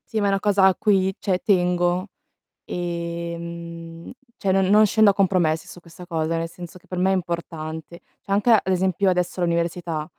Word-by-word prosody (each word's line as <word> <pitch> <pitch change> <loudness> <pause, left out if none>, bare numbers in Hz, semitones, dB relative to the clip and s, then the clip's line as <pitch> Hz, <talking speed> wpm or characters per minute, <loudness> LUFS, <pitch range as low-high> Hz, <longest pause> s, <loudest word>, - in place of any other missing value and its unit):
Sì, - - +3
ma 205 - +1
è - - +2
una 195 0 +1
cosa 200 -2 +3
a 190 - +5
cui, 195 -3 +2
cioè 185 -2 -1
tengo, 180 -1 +1 0.6
ehm, 170 -1 -6 0.3
cioè 195 - -1
non 190 0 +3
non 210 +3 +6
scendo 215 0 +5
a - - 0
compromessi 175 -5 +1
su - - -11
questa 170 +1 -13
cosa, 165 -1 -2
nel 165 0 -2
senso 175 +1 -11
che - - -28
per 180 - -4
me 190 +1 +2
è - - +3
importante. 165 -2 -5 0.2
Cioè 195 - -5
anche 210 +4 +2
ad 220 -3 +6
esempio 190 +1 +1
adesso 180 0 0
all'università, 170 -2 -1
175 Hz, 190 wpm, -23 LUFS, 170-190 Hz, 0.6 s, non